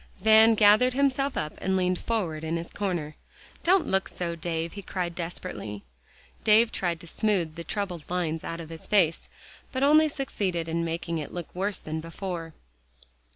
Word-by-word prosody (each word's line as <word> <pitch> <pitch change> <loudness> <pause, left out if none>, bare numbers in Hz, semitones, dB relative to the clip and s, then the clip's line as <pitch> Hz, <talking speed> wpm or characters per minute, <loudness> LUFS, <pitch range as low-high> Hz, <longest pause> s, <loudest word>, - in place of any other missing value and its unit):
Van 220 +1 +7
gathered 215 +4 +5
himself 275 0 +1
up 150 0 -2
and 190 0 0
leaned 180 -1 +1
forward 175 -9 -2
in 160 +1 -1
his 165 +1 -6
corner. 175 -7 -3 0.5
"Don't 370 +1 +4
look 190 0 +1
so, 170 -1 -4
Dave," 165 0 -3
he 200 - -7
cried 180 -2 -3
desperately. 165 - -5 0.6
David 225 +2 +5
tried 170 -3 -1
to - - -10
smooth 180 -4 0
the 170 +1 -7
troubled 180 -5 -4
lines 165 -3 -1
out 165 - -5
of 165 -1 -8
his 165 -1 -8
face, 180 -6 +2 0.4
but 260 +1 -1
only 310 +2 +6
succeeded 195 - -2
in 165 +1 -1
making 165 0 -2
it 150 - -6
look 175 -2 -6
worse 195 +1 -1
than 160 +1 -5
before. 165 -1 -6
180 Hz, 170 wpm, -27 LUFS, 165-210 Hz, 0.6 s, Van